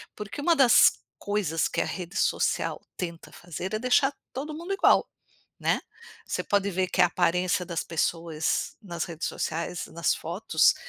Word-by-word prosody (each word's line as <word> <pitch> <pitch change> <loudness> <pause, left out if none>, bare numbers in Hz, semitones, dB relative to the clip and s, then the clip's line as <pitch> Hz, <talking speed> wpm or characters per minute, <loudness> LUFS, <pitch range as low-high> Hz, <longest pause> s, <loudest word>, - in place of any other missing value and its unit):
Porque 210 +7 -7
uma 335 +2 +4
das 260 -5 +6 0.2
coisas 200 -6 0
que - - -1
a - - 0
rede 180 +1 -6
social - - 0 0.2
tenta 170 -2 -6
fazer 175 +3 -6
é 215 - 0
deixar 260 +3 +3 0.2
todo 295 +4 -4
mundo 340 +5 -4
igual, 390 - +4 0.5
né. - - +1 0.5
Você - - -2
pode 200 0 +1
ver 185 0 0
que - - 0
a - - +7
aparência 180 +1 +1
das 170 -2 -3
pessoas 165 -1 -1
nas 175 -5 -4
redes 170 0 -4
sociais, 170 +2 -3
nas 170 0 0
fotos, 165 - +2
180 Hz, 160 wpm, -27 LUFS, 170-215 Hz, 0.5 s, a